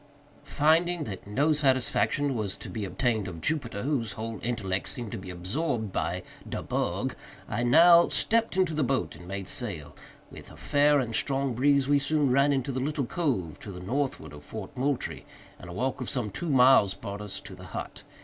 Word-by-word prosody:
Finding 165 Hz, +3 st, +2 dB
that 100 Hz, -6 st, -7 dB
no 145 Hz, +9 st, +2 dB
satisfaction 135 Hz, -1 st, +1 dB
was 105 Hz, -5 st, -3 dB
to -, -, -9 dB
be 110 Hz, -3 st, -3 dB
obtained 110 Hz, +1 st, 0 dB
of 85 Hz, -3 st, -7 dB
Jupiter, 115 Hz, -, -2 dB
whose 125 Hz, -7 st, -1 dB
whole 110 Hz, 0 st, -5 dB
intellect 100 Hz, -5 st, -2 dB
seemed 120 Hz, -5 st, -3 dB
to -, -, -4 dB
be 95 Hz, 0 st, -9 dB
absorbed 110 Hz, -, -2 dB
by 90 Hz, +1 st, -2 dB, 0.3 s
"de -, -, -4 dB
bug," -, -, -1 dB, 0.3 s
I -, -, -2 dB
now 170 Hz, +8 st, +7 dB
stepped 225 Hz, -3 st, +1 dB
into 185 Hz, -4 st, +2 dB
the 150 Hz, -1 st, +1 dB
boat 135 Hz, +1 st, -1 dB
and 90 Hz, -, -12 dB
made 95 Hz, 0 st, -5 dB
sail. 80 Hz, -, -4 dB, 0.4 s
With -, -, -11 dB
a -, -, -14 dB
fair 145 Hz, 0 st, +3 dB
and 120 Hz, -4 st, -2 dB
strong 135 Hz, +1 st, +1 dB
breeze 140 Hz, +2 st, +3 dB
we 145 Hz, 0 st, +4 dB
soon 145 Hz, -1 st, +1 dB
ran 140 Hz, +2 st, +4 dB
into 135 Hz, 0 st, 0 dB
the 130 Hz, -, -2 dB
little 145 Hz, +1 st, -1 dB
cove 120 Hz, -, -2 dB
to 100 Hz, -, -8 dB
the 90 Hz, -, -8 dB
northward 130 Hz, -, -3 dB
of 75 Hz, 0 st, -11 dB
Fort 110 Hz, -, -8 dB
Moultrie, 135 Hz, +1 st, -2 dB, 0.4 s
and 90 Hz, -, -10 dB
a -, -, -7 dB
walk 130 Hz, +7 st, -2 dB
of 125 Hz, -, -3 dB
some 120 Hz, -6 st, -2 dB
two 170 Hz, -, -4 dB
miles 125 Hz, -7 st, +5 dB
brought 100 Hz, +1 st, -7 dB
us 105 Hz, -2 st, -4 dB
to -, -, -9 dB
the -, -, -11 dB
hut. -, -, -7 dB
125 Hz, 195 wpm, -28 LUFS, 100-145 Hz, 0.4 s, now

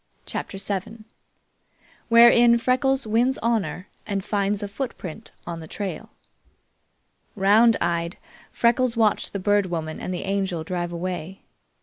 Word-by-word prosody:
CHAPTER 195 Hz, -, -5 dB
VII 200 Hz, +3 st, -4 dB, 1.1 s
Wherein 235 Hz, 0 st, +7 dB
Freckles 260 Hz, +2 st, +1 dB
Wins 235 Hz, +5 st, +1 dB
Honor 205 Hz, -6 st, -1 dB, 0.2 s
and 200 Hz, -2 st, -2 dB
Finds 205 Hz, 0 st, 0 dB
a -, -, -2 dB
Footprint 200 Hz, -, -6 dB
on 170 Hz, -1 st, -5 dB
the 160 Hz, -, -9 dB
Trail 200 Hz, +3 st, -5 dB, 1.3 s
Round 215 Hz, +4 st, +5 dB
eyed, 170 Hz, 0 st, -1 dB, 0.3 s
Freckles 240 Hz, 0 st, +2 dB
watched 220 Hz, -2 st, +2 dB
the -, -, -3 dB
Bird 205 Hz, 0 st, +2 dB
Woman 160 Hz, -3 st, -4 dB
and -, -, -5 dB
the 180 Hz, -, -3 dB
Angel 195 Hz, -4 st, -2 dB
drive 175 Hz, 0 st, -3 dB
away. 180 Hz, +1 st, -5 dB
200 Hz, 125 wpm, -24 LUFS, 180-230 Hz, 1.3 s, Wherein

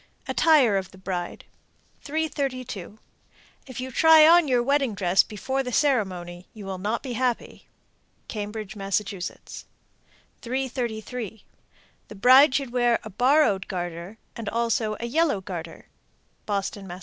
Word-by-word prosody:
_ -, -, -15 dB
ATTIRE 275 Hz, -11 st, +4 dB
OF 190 Hz, -2 st, -4 dB
THE -, -, -16 dB
BRIDE. 185 Hz, -2 st, -5 dB, 0.6 s
332. 270 Hz, -, -4 dB, 0.7 s
If 260 Hz, -2 st, -8 dB
you 260 Hz, +1 st, -5 dB
try 320 Hz, +3 st, +7 dB
on 340 Hz, -1 st, +6 dB
your 250 Hz, -2 st, +2 dB
wedding 275 Hz, -4 st, +1 dB
dress 185 Hz, -1 st, +3 dB
before 265 Hz, +6 st, -3 dB
the 250 Hz, -2 st, -5 dB
ceremony, 185 Hz, -, -1 dB
you 210 Hz, -2 st, -9 dB
will 190 Hz, -1 st, -5 dB
not 215 Hz, +5 st, -2 dB
be 255 Hz, -3 st, -5 dB
happy. 245 Hz, 0 st, -3 dB, 0.6 s
Cambridge, 210 Hz, 0 st, -6 dB
Mass. 195 Hz, -1 st, -1 dB
333. 230 Hz, +3 st, -6 dB, 0.6 s
The -, -, -11 dB
bride 260 Hz, +6 st, +6 dB
should 275 Hz, -4 st, -1 dB
wear 240 Hz, -1 st, +3 dB
a 220 Hz, -, -9 dB
borrowed 245 Hz, -3 st, +2 dB
garter, 175 Hz, +2 st, -5 dB, 0.2 s
and 225 Hz, -3 st, -5 dB
also 230 Hz, -2 st, -1 dB
a 235 Hz, -, -4 dB
yellow 290 Hz, -2 st, +1 dB
garter. 170 Hz, -4 st, -8 dB, 0.6 s
_Boston, 200 Hz, -1 st, -3 dB
Mass. 175 Hz, 0 st, -8 dB
225 Hz, 135 wpm, -25 LUFS, 195-260 Hz, 0.7 s, try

